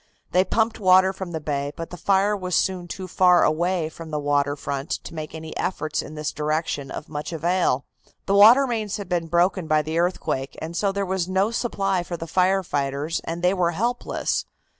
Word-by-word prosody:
They 185 - +4
pumped 220 +4 0
water 190 -1 +5
from 190 -2 -6
the 160 - -3
bay, 145 -1 -3
but 165 - -7
the - - -6
fire 195 +3 +2
was 185 -3 -2
soon 185 -2 0
too 185 +2 -6
far 180 -1 +4
away 170 +1 +1
from 160 0 -10
the 150 -1 -2
water 145 0 +1
front 140 0 -4
to - - -4
make 155 -1 -6
any 160 0 -8
efforts 155 -4 -2
in 155 - -9
this 150 -1 -3
direction 150 -2 -2
of - - -7
much 150 +1 -5
avail. 170 -4 +1 0.4
The 195 - 0
water 225 +7 +8
mains 220 -5 -2
had 200 -3 -7
been 175 -2 -1
broken 175 +1 +1
by 155 0 +3
the 160 +2 -2
earthquake, 145 -6 -1
and 165 +2 -6
so 200 +3 +1
there 200 0 -2
was 185 -1 -2
no 190 +3 +1
supply 195 -6 0
for 175 0 -5
the 165 - -6
fire 185 +3 +2
engines 140 +3 -1
and 170 +1 -4
they 180 +1 +4
were 175 -3 +1
helpless. 240 +4 -1
175 Hz, 205 wpm, -24 LUFS, 155-190 Hz, 0.4 s, water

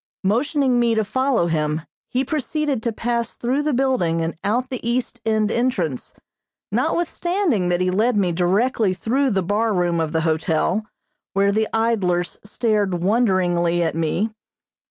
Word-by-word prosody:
Motioning 255 +5 +2
me 235 -1 +2
to 220 - +2
follow 260 -2 +1
him, 155 -1 -1 0.3
he 260 +2 0
proceeded 295 -2 -1
to 235 - -1
pass 235 +1 -2
through 255 +4 0
the 300 +1 0
building 250 - +1
and 165 +1 -2
out 245 +6 0
the 255 - -4
east 240 0 -2
end 215 -1 +2
entrance, 190 - -1 0.6
notwithstanding 325 - 0
that 175 0 +1
he 185 0 +1
led 220 +4 +2
me 185 -3 +2
directly 190 +4 +1
through 260 +8 +1
the 195 -5 0
bar 210 +3 0
room 175 -2 +1
of 160 -1 -1
the 160 0 0
hotel, 165 +5 0 0.5
where 200 +1 +3
the 215 +1 +1
idlers 195 -6 0
stared 205 -4 0
wonderingly 180 -5 +2
at 160 - 0
me. 165 +7 -1
215 Hz, 155 wpm, -21 LUFS, 175-245 Hz, 0.6 s, where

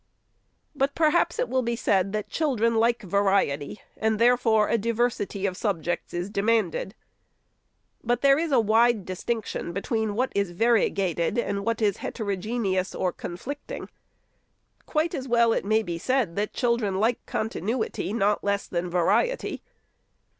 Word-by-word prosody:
But, 275 -1 0
perhaps 330 +8 +2
it - - 0
will 260 - +1
be 235 -1 -1
said 195 -4 +1
that 215 0 -3
children 245 -8 +1
like 235 +1 +2
variety, 195 -5 0
and 220 0 0
therefore 230 -2 +4
a - - +1
diversity 230 -3 -1
of 185 -2 -1
subjects 175 -5 -2
is 175 +3 -4
demanded. 210 -1 0 1.1
But 240 +1 0
there 275 +1 +5
is 330 -1 -1
a 260 - +5
wide 225 -1 +3
distinction 190 -1 -3
between 215 +2 -1
what 255 +4 0
is 200 -3 -1
variegated 195 -3 +1
and 200 -4 -1
what 230 +1 -1
is 205 -3 +2
heterogeneous 200 -2 -2
or 180 - -1
conflicting. 270 +12 -7 1.0
Quite 315 +2 0
as 270 -4 -4
well 235 -1 +4
may 220 +2 +2
it - - -9
be 170 -2 -4
said, 250 -6 0
that 205 +1 -1
children 235 -6 0
like 225 +3 +1
continuity, 220 -1 -2
not 210 -1 +1
less 200 0 0
than 175 0 -3
variety. 180 - +1
220 Hz, 145 wpm, -26 LUFS, 195-240 Hz, 1.1 s, there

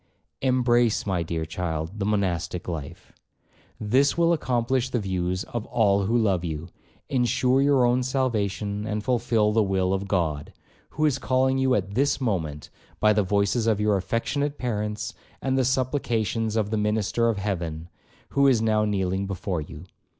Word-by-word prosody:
'Embrace, 120 -3 +2
my 95 -4 0
dear 80 -1 -3
child, 80 +3 -4
the 100 - -1
monastic 90 -4 -1
life; 80 -5 -7 0.7
this 130 +8 +2
will 170 0 +4
accomplish 130 -3 0
the 125 - -1
views 95 -2 -2
of 120 -3 -5
all 100 -3 +2
who 115 +4 +2
love 100 -6 +1
you, 80 0 -4 0.4
ensure 125 +1 +2
your 140 -3 +4
own 120 +1 +2
salvation, 110 -5 -1
and 105 -1 -2
fulfil 115 -3 +1
the 110 +1 +3
will 95 -2 +1
of 95 +1 -2
God, 80 -7 -1 0.4
who 155 - -1
is 140 -3 +1
calling 130 0 +1
you 130 -1 +3
at 100 -2 -2
this 140 +5 +1
moment 80 - -3 0.3
by 105 0 +4
the 105 - +2
voices 100 +4 +1
of 110 -2 +2
your 105 -1 +2
affectionate 140 +9 -1
parents, 105 -3 -3 0.3
and 130 -1 -1
the 135 - +2
supplications 120 -4 0
of 110 -2 0
the 110 - 0
minister 105 +2 +1
of 110 - -1
heaven, 85 -5 -3 0.4
who 140 0 +3
is 130 -4 +4
now 110 -1 +2
kneeling 95 -1 -1
before 95 -3 -3
you.' 75 +2 -9
105 Hz, 165 wpm, -25 LUFS, 95-125 Hz, 0.7 s, will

